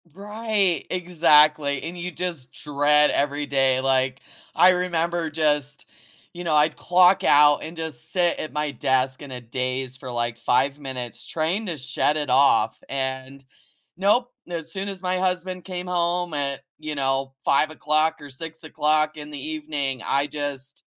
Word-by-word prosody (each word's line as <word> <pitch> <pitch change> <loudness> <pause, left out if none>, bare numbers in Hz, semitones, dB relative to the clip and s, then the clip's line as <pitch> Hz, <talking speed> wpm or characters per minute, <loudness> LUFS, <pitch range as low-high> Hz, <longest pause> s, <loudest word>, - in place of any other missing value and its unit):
Right, 205 -1 -1
exactly, 155 -5 +3
and 170 +2 -7
you 175 +1 -5
just 165 -7 -4
dread 150 0 +3
every 145 +1 0
day, 135 -2 +2
like, 130 0 +3 0.4
I 185 - +6
remember 170 -2 -1
just, 150 -2 0 0.5
you 175 0 -8
know, 160 -3 0
I'd 150 +1 +3
clock 180 +1 +3
out 145 0 +5
and 165 +1 -8
just 160 -1 -5
sit 175 -2 +1
at 155 - -5
my 150 -1 -1
desk 130 0 0
in 145 - -9
a 125 - -6
daze 130 +2 -3
for 130 -1 -9
like 120 -1 -1
5 130 +4 +1
minutes, 130 -4 -5
trying 170 +7 -1
to 170 -3 -3
shut 140 +3 0
it 145 -4 -2
off, 125 -4 +3
and, 130 0 -4 0.5
nope, 210 +7 +2 0.2
as 165 -2 -5
soon 195 +1 -3
as 190 -2 -6
my 185 0 0
husband 185 -1 -1
came 180 -1 -5
home 175 -1 -1
at, 140 -2 -2 0.2
you 155 -1 -5
know, 135 -1 0
5:00 155 +2 +2
or 145 - -10
6:00 155 0 -1
in 150 0 -9
the 145 -1 -8
evening, 145 -3 -4
I 140 +1 +1
just 145 -2 -4
150 Hz, 155 wpm, -23 LUFS, 135-175 Hz, 0.5 s, I